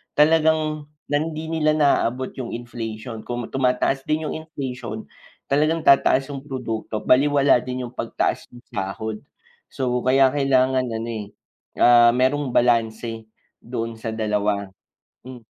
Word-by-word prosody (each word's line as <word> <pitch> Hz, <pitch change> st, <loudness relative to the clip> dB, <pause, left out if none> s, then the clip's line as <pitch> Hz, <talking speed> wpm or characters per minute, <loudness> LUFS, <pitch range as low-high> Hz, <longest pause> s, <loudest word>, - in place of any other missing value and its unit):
talagang 155 Hz, -1 st, +2 dB, 0.2 s
nan 155 Hz, +2 st, 0 dB
'di 160 Hz, +1 st, -5 dB
nila 155 Hz, -1 st, +2 dB
naaabot 130 Hz, -4 st, +1 dB
yung 120 Hz, -, -4 dB
inflation, 115 Hz, -1 st, -6 dB
kung 120 Hz, +2 st, -5 dB
tumataas 135 Hz, +1 st, 0 dB
din 155 Hz, +1 st, 0 dB
yung -, -, -4 dB
inflation, 125 Hz, -7 st, -6 dB, 0.5 s
talagang 155 Hz, +3 st, +2 dB
tataas 135 Hz, 0 st, +4 dB
yung 140 Hz, -, -5 dB
produkto 115 Hz, -6 st, -5 dB
balewala 140 Hz, 0 st, +4 dB
din 125 Hz, +1 st, -5 dB
yung 120 Hz, -, -7 dB
pagtaas -, -, -2 dB
ng 120 Hz, 0 st, -16 dB
sahod. 105 Hz, +3 st, -4 dB, 0.5 s
So 125 Hz, -2 st, -2 dB
kaya 130 Hz, +1 st, +4 dB
kailangan 130 Hz, -2 st, +2 dB
ano, 115 Hz, 0 st, -4 dB
eh, 110 Hz, -2 st, -5 dB, 0.6 s
ah, 120 Hz, 0 st, +7 dB
merong 130 Hz, +1 st, +1 dB
balanse, 115 Hz, -1 st, +1 dB, 0.4 s
doon 115 Hz, -1 st, -4 dB
sa 110 Hz, 0 st, -5 dB
dalawa, 105 Hz, -2 st, -1 dB, 0.6 s
hmm. 130 Hz, -1 st, -10 dB
125 Hz, 130 wpm, -22 LUFS, 115-145 Hz, 0.6 s, ah